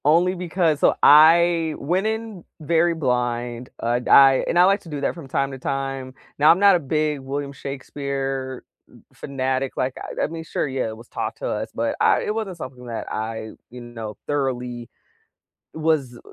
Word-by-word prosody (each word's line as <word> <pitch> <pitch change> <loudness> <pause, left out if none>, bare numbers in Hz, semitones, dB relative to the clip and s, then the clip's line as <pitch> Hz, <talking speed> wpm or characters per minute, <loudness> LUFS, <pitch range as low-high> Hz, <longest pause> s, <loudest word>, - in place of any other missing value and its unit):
Only 170 +5 +4
because 175 -4 0
so, - - +4
I 165 +1 +6
went 180 +8 0
in 220 -4 -4 0.2
very 165 +2 +2
blind, 125 -3 -2
uh, 120 +1 +1
I 135 -1 +7
and - - 0
I 175 - +7
like 195 +2 +4
to 170 - -13
do 150 -2 -4
that - - 0
from 165 -5 -10
time 140 0 -1
to 135 - -8
time. 135 -1 -4 0.2
Now, 150 +2 +6
I'm 170 - +7
not 200 -1 +6
a - - +2
big 150 0 -1
William 140 +1 -5
Shakespeare 135 -1 -5 0.3
m - - -19
fanatic, 130 -1 -3
like, 130 0 -1
I - - -4
I - - +1
mean, 165 +1 -7
sure, 155 - -2
yeah, 130 -3 -2
it 110 0 -7
was 115 +1 -14
taught - - -4
to - - -4
us, - - -3
but - - -1
I - - +4
it 210 - -1
wasn't 210 -5 -4
something 130 -4 -9
that 115 -1 -5
I, 110 0 -4 0.2
you 125 - -10
know, 115 -3 -8
thoroughly 125 -4 -3 0.8
was 155 -6 -1
140 Hz, 185 wpm, -22 LUFS, 130-165 Hz, 0.8 s, I